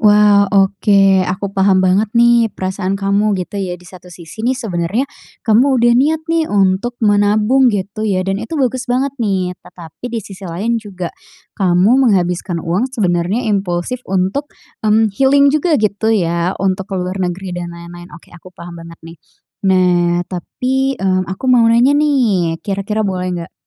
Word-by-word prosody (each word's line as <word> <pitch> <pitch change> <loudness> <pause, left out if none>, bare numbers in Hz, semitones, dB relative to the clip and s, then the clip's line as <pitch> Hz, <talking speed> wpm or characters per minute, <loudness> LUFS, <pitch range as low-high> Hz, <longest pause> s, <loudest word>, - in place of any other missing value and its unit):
wah, 205 -1 +5
oke, 200 0 +2 0.3
aku 185 +2 -3
paham 190 -1 +2
banget 195 +4 +2
nih 235 -1 +4
perasaan 190 0 -3
kamu 200 +1 0
gitu 190 +2 -5
ya. 180 -2 -4
Di 180 - -20
satu 180 0 -14
sisi 170 +3 -11
nih 250 +3 0
sebenernya, 205 +1 -2 0.4
kamu 250 +5 +3
udah 240 0 +3
niat 310 +6 +1
nih 330 -1 0
untuk 200 +4 0
menabung 210 +5 +3
gitu 205 +1 -3
ya 185 -2 0
dan 195 +2 -2
itu 310 +8 -5
bagus 260 -1 -1
banget 260 +2 0
nih. 190 -4 -1
Tetapi 165 +6 -11
di 230 -2 -4
sisi 195 -1 -11
lain 225 +7 -2
juga, 185 -5 -7 0.4
kamu 200 +8 +3
menghabiskan 180 -3 -1
uang 185 +10 -1
sebenernya 190 -1 -1
impulsif 195 +2 -2
untuk, 195 +10 -1 0.3
mmm, 215 -1 +2
healing 280 +4 +3
juga 305 +1 +1
gitu 215 0 -1
ya 175 -4 0
untuk 190 0 -2
ke 195 - -4
luar 185 +1 -3
negeri 180 +1 -3
dan 175 - -5
lain-lain, 175 +1 -11
oke, 170 - -19
aku 175 +1 -14
paham 170 +1 -10
banget 170 0 -11
nih. 165 +1 -11 0.5
Nah, 175 -2 +2
tapi, 260 +9 -2
mmm, 185 -3 -1
aku 190 +6 -6
mau 245 -3 +4
nanya 240 +4 +4
nih 240 - +1
kira-kira 205 +2 -2
boleh 185 -2 -2
nggak? 170 -1 -8
200 Hz, 165 wpm, -16 LUFS, 180-235 Hz, 0.5 s, wah